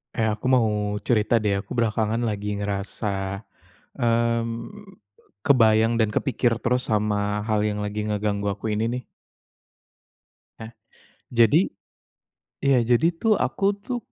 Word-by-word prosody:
Eh, 110 -1 +1
aku 105 +2 -3
mau 125 -3 +4 0.4
cerita 115 0 +3
deh 100 -1 0
aku - - -27
belakangan 115 -2 0
lagi 105 -1 -3
ngerasa, 100 +1 -3 0.9
mmm, 115 - -1 0.6
kebayang 115 -3 +4
dan 110 -2 +3
kepikir 125 0 0
terus 125 +1 0
sama 105 -1 0
hal 105 -1 +1
yang 105 -1 -1
lagi 105 +1 -3
ngeganggu 105 -1 -1
aku 100 +2 -8
ini 110 - 0
nih. 125 +1 -4 1.6
Nah, 110 0 -8 0.6
jadi, 120 - +4 1.0
iya, 135 -2 +4
jadi 120 +6 +3
tuh 225 - +3
aku 195 - -2 0.2
tuh 250 +1 -2
110 Hz, 125 wpm, -24 LUFS, 105-120 Hz, 1.6 s, mau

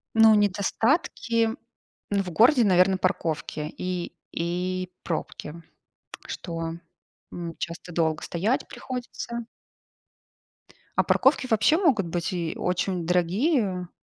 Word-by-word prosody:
Ну, 225 -1 +8
недостатки 225 - +1 0.6
в 195 -3 0
городе, 240 - +5
наверно, 185 -1 +4
парковки 160 -4 -2
и 180 -1 -3 0.2
и 180 +2 -2
пробки, 165 -1 -5 0.7
что, 165 -2 -4 0.6
м, 170 -1 -5
часто 170 +1 -6
долго 160 -2 +1
стоять 205 +9 0
приходится. 240 -2 -6 1.5
А - - +6
парковки - - +3
вообще 225 +6 +4
могут 265 - +3
быть 165 0 -2
и 170 -3 -2
очень 180 -1 -1
дорогие, 185 - +1
185 Hz, 100 wpm, -26 LUFS, 170-225 Hz, 1.5 s, Ну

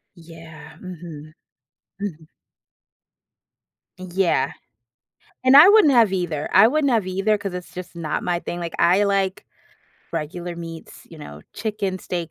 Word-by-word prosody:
Yeah. 165 -2 -13
Mhm. 160 -4 -10 0.7
Mhm. 160 -6 -6 1.7
Yeah. 185 0 0 0.9
And 260 +2 +6
I 315 +7 +10
wouldn't 410 -9 +6
have 225 -5 +4
either, 165 -5 -2
I 205 +4 +7
wouldn't 285 -2 +1
have 215 -5 +1
either 195 +3 0
‘cause 195 -2 -6
it's 180 0 -8
just 180 -1 -9
not 160 -3 -3
my 175 -1 -1
thing. 175 0 -6
Like, 170 -1 -5
I 190 +4 +4
like 195 -1 -1 0.7
regular 170 +2 -5
meats, 165 -1 -10
you 165 - -12
know, 75 - -10
chicken, 205 -3 -3
steak, 170 -3 -5
180 Hz, 135 wpm, -22 LUFS, 165-200 Hz, 1.7 s, I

